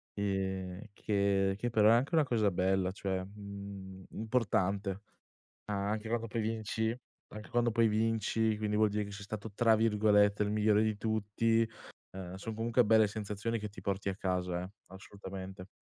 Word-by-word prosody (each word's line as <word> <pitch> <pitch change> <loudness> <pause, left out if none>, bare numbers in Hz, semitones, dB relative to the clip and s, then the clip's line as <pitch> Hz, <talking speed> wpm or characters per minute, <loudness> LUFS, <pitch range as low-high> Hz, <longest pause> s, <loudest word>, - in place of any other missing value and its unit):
ehm, 95 -2 -2
che 100 -2 +1
che 120 +4 -2
però 110 -2 +5
è - - +7
anche 125 +8 +2
una 160 - +5
cosa 115 -6 +2
bella, 95 +1 +1
cioè, 95 -1 -2
mhmm, 100 -1 -9
importante, 100 -3 0 0.6
anche 105 +2 -2
quando 115 0 -1
poi 115 +1 -2
vinci 110 0 -1 0.4
anche 105 0 -8
quando 120 -1 +2
poi 115 +1 +4
vinci, 110 0 +1
quindi 105 0 -1
vuol 110 0 +4
dire 105 +1 -1
che 100 - -9
sei 100 0 -8
stato 105 +1 -6
tra 115 +1 +4
virgolette 105 -2 +4
"il 105 - -1
migliore" 105 0 +3
di 110 -1 0
tutti, 110 +1 +1 0.5
uhm, 90 -1 -6
son 110 +4 -5
comunque 115 +2 +2
belle 110 0 +5
sensazioni, 105 +2 -3
che 105 0 -5
ti 100 - -11
porti 100 +1 -2
a 95 - -3
casa, 90 -2 -1
eh, 90 - -7 0.2
assolutamente. 95 0 -9
105 Hz, 165 wpm, -32 LUFS, 95-110 Hz, 0.6 s, è